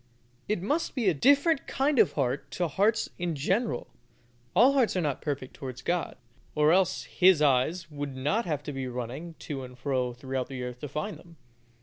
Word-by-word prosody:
It 210 -4 0
must 295 - -1
be 240 -6 0
A - - +2
DIFFERENT 280 - +3
KIND 275 0 +1
OF 185 -10 +5
HEART 135 0 -1
TO 175 +4 -1
HEARTS 205 +9 +1
IN 175 -2 -1
GENERAL; 155 - 0 0.7
all 245 +8 +6
hearts 255 -7 +2
are 180 - +1
not 145 -4 -1
perfect 140 -3 -4
towards 130 -2 -8
God, 175 0 -1 0.4
or 150 0 +4
else 185 0 +2
His 185 -3 +4
eyes 150 +4 +2
would 145 -2 -5
not 150 - 0
have 150 -3 -2
to 145 - -5
be 135 -1 -3
running 125 +7 -6
to 135 -3 -4
and 125 0 -10
fro 130 -2 -1
throughout 130 0 -3
the 130 -2 -6
earth 125 0 -6
to 145 - -5
find 155 +9 -4
them. 170 -1 -16
150 Hz, 195 wpm, -28 LUFS, 130-190 Hz, 0.7 s, all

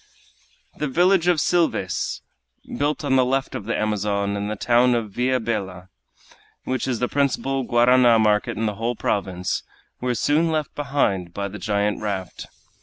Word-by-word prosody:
The 150 - -2
village 175 +4 +3
of 175 -2 +4
Silves, 160 - 0 0.5
built 145 +2 -1
on 130 -2 +3
the 130 - +5
left 135 +2 -1
of 100 - -5
the 115 - -1
Amazon, 100 -1 -1
and 100 +1 -3
the 105 - -2
town 120 +3 +3
of 110 -3 -3
Villa 125 +4 0
Bella, 95 -5 -4 0.7
which 130 -1 -2
is 125 -3 0
the 125 - 0
principal 135 -1 0
guarana 120 0 +4
market 105 -2 +1
in 110 - -1
the 105 -2 -2
whole 120 +1 0
province, 95 -4 -2 0.4
were 125 -1 -1
soon 155 +7 +2
left 155 -2 -2
behind 110 -12 -1
by 100 0 -2
the 105 +2 -8
giant 105 0 -1
raft. 95 -4 -4
120 Hz, 165 wpm, -23 LUFS, 100-135 Hz, 0.7 s, the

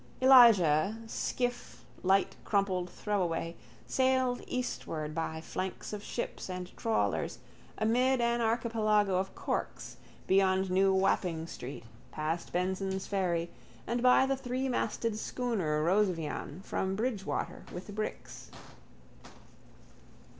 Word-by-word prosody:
Elijah, 220 - +6
skiff, 245 +2 -3 0.2
light 190 +1 +2
crumpled 190 -3 0
throwaway, 175 -5 -2 0.3
sailed 260 -1 +1
eastward 160 -11 -3
by 160 0 -3
flanks 185 +5 -5
of 210 - -4
ships 235 - -5
and 180 0 -6
trawlers, 225 -1 0 0.4
amid 250 +4 +2
an 235 0 +1
archipelago 220 -4 +2
of 190 +1 -2
corks, - - -4 0.3
beyond 190 -1 +3
new 190 +1 +4
Wapping 185 -4 +1
street 135 -6 -8 0.3
past 160 +2 -3
Benson's 190 +1 -1
ferry, 175 -4 -1 0.3
and 240 +1 -1
by 250 +1 +6
the 270 0 +1
threemasted 250 -4 -2
schooner 195 -13 -1
Rosevean 175 -2 0
from 190 0 -2
Bridgwater 215 -2 -2
with 185 +4 -7
bricks. 215 +1 -6
195 Hz, 105 wpm, -31 LUFS, 180-235 Hz, 0.4 s, Elijah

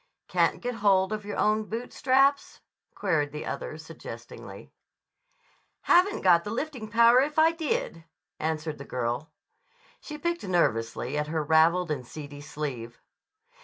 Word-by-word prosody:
"Can't - - +1
get 245 0 -2
hold 195 0 +3
of 210 -1 -5
your 205 - -5
own 215 0 +2
boot 230 +3 -6
straps?" 275 +2 +2 0.3
queried 160 -7 0
the 150 +1 -6
other - - -5
suggestingly. - - -10 1.1
"Haven't 375 +4 +3
got 170 -2 +5
the - - -5
lifting 245 -1 -4
power 235 +3 +6
if 295 +2 -2
I 320 +1 +6
did," 295 - -3 0.3
answered 155 -1 -3
the - - -6
girl. 125 +4 -3 0.7
She 300 - -8
picked 340 +2 -2
nervously 145 - 0
at 150 - -2
her 155 0 -1
raveled 160 +3 +3
and 135 -4 -2
seedy 145 +2 -9
sleeve. 130 -6 -6
180 Hz, 140 wpm, -27 LUFS, 150-245 Hz, 1.1 s, power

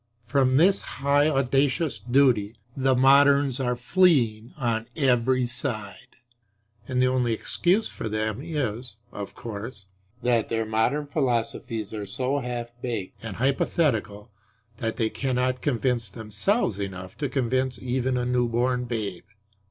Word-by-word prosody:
From 130 +2 +2
this 190 +6 +4
high 145 +2 +1
audacious 135 0 +1
duty 120 -2 +2 0.2
the 135 -1 +2
moderns 140 +1 +5
are 125 -2 0
fleeing 120 -6 +2
on 115 -4 -1
every 130 -3 +2
side; 120 -2 -4 0.7
and 130 -1 -1
the 130 - +4
only 125 -2 +1
excuse 185 - +1
for 110 - -6
them 110 +2 -2
is, 130 -8 -3 0.2
(of 100 -1 -7
course,) 105 -2 -7 0.4
that 120 -3 +2
their 115 -1 -1
modern 115 +7 0
philosophies 115 -6 -2
are 105 -2 -5
so 130 +5 -1
half 120 -2 -5
baked 115 -7 -4
and 115 -4 -6
hypothetical 115 -5 0 0.5
that 115 0 -3
they 110 -2 0
cannot 125 +2 -1
convince 125 -5 0
themselves 110 - 0
enough 95 -2 -6
to 145 -3 -1
convince 130 -1 0
even 130 0 -1
a 125 - -1
newborn 125 0 +1
babe. 105 -7 -4
125 Hz, 130 wpm, -25 LUFS, 110-135 Hz, 0.7 s, moderns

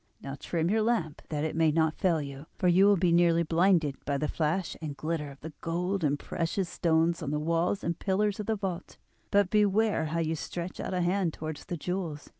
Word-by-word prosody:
Now 135 0 -6
trim 170 +1 -1
your 220 +1 +2
lamp 195 -10 0
that 150 -1 -2
it 155 - -2
may 160 -1 +3
not 160 0 +1
fail 165 -5 +2
you, 140 +2 -8
for 180 - +1
you 185 +3 +6
will 205 -1 +5
be 175 0 +2
nearly 170 0 +4
blinded 165 -3 +2
by 140 0 -1
the 150 +2 -1
flash 165 +4 -1
and 150 -3 -5
glitter 155 -2 -2
of 140 0 -13
the 160 +1 -8
gold 180 +3 -1
and 145 -1 +2
precious 170 +5 -2
stones 165 0 +1
on 150 - -3
the 150 - 0
walls 165 +5 0
and 170 0 -2
pillars 205 +1 0
of 210 - -4
the 220 - +1
vault; 190 -3 -5 0.3
but 200 -2 +3
beware 210 -3 +3
how 160 +2 -2
you 160 0 0
stretch 175 +3 -5
out 185 - -3
a 180 - +1
hand 175 -1 +1
towards 155 -1 -6
the 175 - -4
jewels! 170 -3 -4
170 Hz, 225 wpm, -29 LUFS, 155-190 Hz, 0.3 s, you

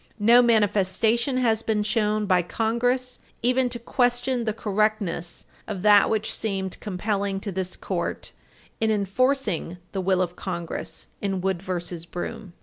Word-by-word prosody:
No 235 +3 +6
manifestation 225 +2 +2
has 225 -3 +2
been 215 -2 0
shown 210 0 +1
by 185 -3 +3
Congress 240 +7 -1 0.2
even 250 +1 +2
to 240 - -5
question 245 +1 0
the 220 - +1
correctness 210 -5 -1 0.2
of 200 -4 -4
that 205 -1 +6
which 220 -1 0
seemed 195 -3 -3
compelling 200 0 -2
to 200 - -4
this 185 0 -3
Court - - -3 0.5
in 220 - +2
enforcing 210 - 0
the 195 - -2
will 185 0 +2
of 175 0 -5
Congress 170 -3 -5 0.2
in 195 -2 -1
Wood 190 -1 -1
v. 185 -1 -3 0.4
Broom. 195 +1 -6
210 Hz, 145 wpm, -25 LUFS, 190-235 Hz, 0.5 s, No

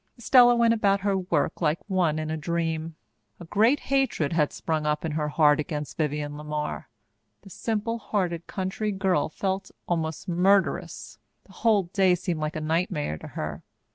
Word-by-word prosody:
Estella 245 0 +6
went 235 -1 +4
about 200 -3 +2
her 200 -1 +1
work 180 -5 -1
like 155 -1 +2
one 180 -6 +1
in 155 0 -3
a - - -1
dream. 165 0 -2 0.4
A - - -9
great 225 - +3
hatred 270 - 0
had 150 -3 +2
sprung 155 -2 -2
up 150 +1 0
in 160 - -2
her 150 0 -1
heart 150 0 +4
against 150 -1 -4
Vivienne 150 -1 -2
LeMar. 150 0 -4 0.6
The 195 - -13
simple 230 +2 -2
hearted 180 -6 -2
country 190 +3 -2
girl 190 -7 +1
felt 190 +3 -3 0.2
almost 160 -2 -2
murderous. 190 +3 +1 0.2
The - - -20
whole 215 -4 +2
day 185 +1 +2
seemed 175 -2 -3
like 155 0 -3
a 155 - -3
nightmare 155 - -1
to - - -9
her. 75 0 -5
170 Hz, 170 wpm, -26 LUFS, 150-195 Hz, 0.6 s, Estella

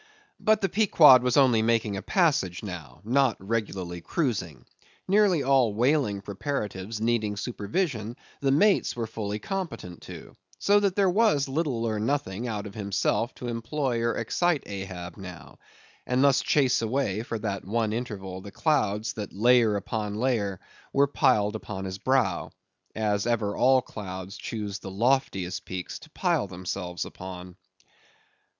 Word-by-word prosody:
But 215 -1 +3
the 195 - +2
Pequod 160 - +7
was 125 +1 +1
only 125 -5 +5
making 115 -2 +1
a 95 - -4
passage 140 - +1
now; 85 -8 -8
not 125 +1 +2
regularly 95 -4 -3
cruising; 95 - -2 0.4
nearly 195 -6 +4
all 130 -6 +3
whaling 120 -4 +2
preparatives 105 -2 -4
needing 110 -2 0
supervision 115 - -2 0.2
the 140 - +1
mates 195 +9 +3
were 120 -1 -2
fully 105 -2 -4
competent 155 - -5
to, - - -10 0.2
so 205 +1 +4
that 200 -2 +1
there 200 -1 +3
was 200 -9 +3
little 135 -5 -1
or 110 -2 -1
nothing, 115 -2 -1
out 105 -3 -3
of 100 - -8
himself, 105 +3 -1
to 125 - -7
employ 120 +1 -2
or 115 0 +1
excite 160 +7 +1
Ahab, 95 -3 -7
now; 90 -3 -10 0.5
and 125 +1 +2
thus 140 -2 +5
chase 135 -5 +2
away, 115 -3 0
for 115 0 -4
that 100 -3 -3
one 110 +2 -1
interval, 95 -6 -5
the 100 - -9
clouds 110 -7 0
that 105 -3 -6
layer 115 0 +4
upon 105 0 -3
layer 105 -5 0 0.3
were 140 - +4
piled 125 -7 +2
upon 95 -3 -5
his 95 +1 -5
brow, 130 +1 +1 0.5
as 105 -1 0
ever 110 -4 0
all 130 0 +4
clouds 95 -2 -7
choose 105 -3 -5
the 95 - -8
loftiest 100 -4 0
peaks 90 -1 -6
to - - -15
pile - - 0
themselves 90 0 -4
upon. 90 -1 -9
110 Hz, 150 wpm, -27 LUFS, 100-135 Hz, 0.5 s, Pequod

